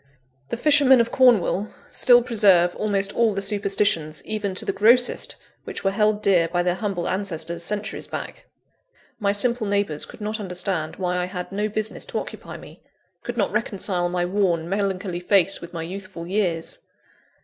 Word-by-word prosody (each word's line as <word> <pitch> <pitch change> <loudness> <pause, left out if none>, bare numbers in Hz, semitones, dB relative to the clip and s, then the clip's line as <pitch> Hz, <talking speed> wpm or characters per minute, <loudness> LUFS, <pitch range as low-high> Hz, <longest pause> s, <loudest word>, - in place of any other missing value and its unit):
The - - -3
fishermen 280 -2 +5
of 235 0 +1
Cornwall 220 -6 +3 0.2
still 245 -1 +5
preserve 195 -7 +3
almost 200 -2 -1
all 225 -3 +2
the 195 - -2
superstitions, 195 -6 +1
even 210 -3 -3
to - - -2
the - - -1
grossest, 235 +5 +3 0.3
which - - -7
were 195 - +2
held 210 +1 +1
dear 175 -4 +3
by 175 +1 -1
their 180 0 +1
humble 190 -3 -3
ancestors, 170 -3 -3
centuries 210 +4 -3
back. - - -7 0.7
My 200 -2 +1
simple 235 +2 0
neighbours 200 -7 -1
could - - -14
not 215 +1 -4
understand 180 -4 -1
why 180 -1 -2
I 180 - 0
had 180 -1 -6
no 210 +2 -1
business 215 +1 -3
to - - -4
occupy - - -7
me; - - -14 0.4
could 240 0 -6
not 205 - 0
reconcile 190 -4 -1
my 175 0 -1
worn, 180 -3 0
melancholy 195 -1 -2
face 195 +1 +2
with 170 - -9
my 165 -2 -5
youthful 185 0 -8
years. 180 -3 -2
195 Hz, 170 wpm, -23 LUFS, 180-215 Hz, 0.7 s, fishermen